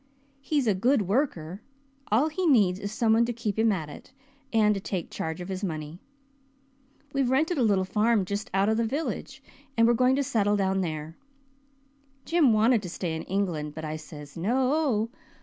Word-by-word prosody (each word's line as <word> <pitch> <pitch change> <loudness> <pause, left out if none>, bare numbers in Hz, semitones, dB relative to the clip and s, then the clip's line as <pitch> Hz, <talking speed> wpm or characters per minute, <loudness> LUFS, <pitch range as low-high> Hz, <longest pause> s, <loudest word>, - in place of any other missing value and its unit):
He's 280 0 0
a 215 - +3
good 230 +5 +2
worker 195 - -1 0.5
all 255 +9 +3
he 360 +3 -1
needs 200 - +4
is 200 0 -5
some 220 0 +2
one 230 +1 +4
to 240 - -2
keep 220 -3 -3
him 225 0 +4
at 165 -6 -2
it, 145 - -12 0.4
and 215 -2 +4
to 195 - -4
take 185 -3 -4
charge 160 +1 -4
of 180 - -6
his 190 +1 -5
money. 155 -2 -4 1.1
We've 275 -3 +1
rented 310 +5 +1
a - - +2
little 200 -5 +2
farm 210 +1 +2
just 200 +3 -4
out 195 +1 +2
of 220 0 +2
the 230 - +2
village, 280 +8 -4 0.3
and 230 - +5
we're 235 - +5
going 255 +2 +3
to 280 - +1
settle 210 -5 +1
down 190 -1 +1
there. 155 -2 -5 1.1
Jim 325 -7 +4
wanted 220 +1 +4
to 180 - -6
stay 170 -2 -3
in 160 - -4
England 170 -6 -2
but 160 0 -5
I 155 0 -4
says 150 -2 -10
'No.' 250 - +1
210 Hz, 190 wpm, -27 LUFS, 180-245 Hz, 1.1 s, and